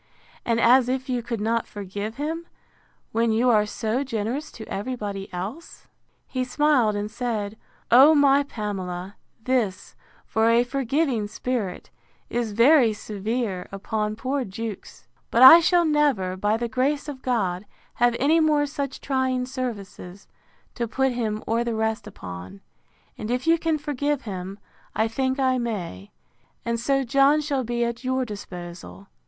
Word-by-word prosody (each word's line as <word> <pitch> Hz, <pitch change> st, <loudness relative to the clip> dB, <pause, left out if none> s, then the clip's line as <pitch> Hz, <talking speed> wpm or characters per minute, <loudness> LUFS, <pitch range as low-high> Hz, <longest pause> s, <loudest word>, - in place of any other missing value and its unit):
and 230 Hz, -1 st, +1 dB
as 245 Hz, +2 st, +5 dB
if 260 Hz, +1 st, -2 dB
you 250 Hz, -1 st, 0 dB
could 235 Hz, -1 st, -4 dB
not 225 Hz, +2 st, 0 dB
forgive 205 Hz, +2 st, -6 dB
him, 320 Hz, +4 st, -4 dB, 0.6 s
when 230 Hz, 0 st, +1 dB
you 240 Hz, +3 st, +3 dB
are 210 Hz, -2 st, +3 dB
so 225 Hz, +5 st, -2 dB
generous 240 Hz, +3 st, -3 dB
to 220 Hz, -, -10 dB
every 250 Hz, +6 st, -3 dB
body 200 Hz, -4 st, -6 dB
else? 205 Hz, -, -7 dB, 0.4 s
He 255 Hz, -1 st, -2 dB
smiled 255 Hz, -4 st, +2 dB
and 205 Hz, +1 st, -3 dB
said, 220 Hz, -3 st, -3 dB, 0.4 s
O 275 Hz, +6 st, +8 dB
my 285 Hz, -1 st, +5 dB
Pamela, 195 Hz, -7 st, -5 dB, 0.3 s
this, 230 Hz, -8 st, -1 dB, 0.3 s
for 220 Hz, +1 st, +2 dB
a 235 Hz, +1 st, +4 dB
forgiving 265 Hz, -2 st, 0 dB
spirit, 215 Hz, -3 st, -4 dB, 0.4 s
is 235 Hz, -3 st, -1 dB
very 240 Hz, +1 st, +5 dB
severe 210 Hz, -2 st, -3 dB
upon 210 Hz, +2 st, -2 dB
poor 265 Hz, +4 st, -2 dB
Jewkes: 215 Hz, 0 st, -7 dB, 0.2 s
But 235 Hz, -, +4 dB
I 295 Hz, +6 st, +12 dB
shall 345 Hz, +1 st, +3 dB
never, 285 Hz, -, +1 dB
by 205 Hz, +3 st, +1 dB
the 235 Hz, +1 st, -2 dB
grace 270 Hz, +5 st, 0 dB
of 275 Hz, -3 st, -7 dB
God, 200 Hz, -6 st, -1 dB, 0.3 s
have 240 Hz, 0 st, +2 dB
any 310 Hz, +5 st, +4 dB
more 305 Hz, -2 st, +3 dB
such 280 Hz, -2 st, -5 dB
trying 260 Hz, -2 st, 0 dB
services, 210 Hz, -7 st, -6 dB, 0.5 s
to 235 Hz, -2 st, -3 dB
put 265 Hz, +3 st, +1 dB
him 220 Hz, -3 st, -2 dB
or 230 Hz, +2 st, +1 dB
the 235 Hz, -1 st, -2 dB
rest 220 Hz, 0 st, -1 dB
upon; 90 Hz, +2 st, -9 dB, 0.6 s
and 215 Hz, -, -5 dB
if 250 Hz, +1 st, -1 dB
you 330 Hz, 0 st, +4 dB
can 320 Hz, -1 st, 0 dB
forgive 290 Hz, -1 st, -2 dB
him, 190 Hz, -2 st, -6 dB, 0.4 s
I 220 Hz, -, +2 dB
think 260 Hz, +4 st, -1 dB
I 260 Hz, -1 st, +2 dB
may: 180 Hz, -, -4 dB, 0.6 s
and 235 Hz, 0 st, -1 dB
so 275 Hz, +3 st, +1 dB
John 275 Hz, +4 st, +4 dB
shall 285 Hz, -3 st, -1 dB
be 240 Hz, 0 st, -1 dB
at 235 Hz, +1 st, -4 dB
your 260 Hz, 0 st, 0 dB
disposal. 175 Hz, -, -9 dB
235 Hz, 155 wpm, -24 LUFS, 210-265 Hz, 0.6 s, I